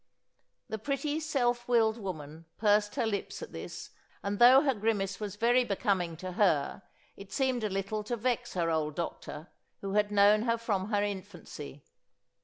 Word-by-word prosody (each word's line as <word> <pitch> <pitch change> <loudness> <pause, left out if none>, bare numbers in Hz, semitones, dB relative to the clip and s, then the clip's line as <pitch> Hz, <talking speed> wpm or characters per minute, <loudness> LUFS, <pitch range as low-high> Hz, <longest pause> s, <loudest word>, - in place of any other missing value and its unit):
The 220 - -4
pretty 290 +6 -1
self 245 -6 0
willed 230 -2 +3
woman 160 -5 -7
pursed 210 0 +2
her - - +1
lips 205 -3 -3
at - - -9
this - - -8 0.3
and 200 0 -2
though 250 +3 +8
her 275 -3 +3
grimace 205 -3 -1
was 210 -2 -4
very 240 +3 +3
becoming 195 -6 -1
to 185 +2 -6
her 180 -3 +1 0.3
it 200 0 -12
seemed 260 -1 0
a 215 - 0
little 195 +2 -2
to 240 +2 -2
vex 240 0 -1
her 170 -2 +1
old 155 -2 -1
doctor 165 -1 -5 0.3
who 195 0 -4
had 210 0 +2
known 205 +1 +5
her 230 0 +1
from 210 -4 -2
her 205 -2 +1
infancy. 185 -8 -7
205 Hz, 170 wpm, -30 LUFS, 190-235 Hz, 0.3 s, though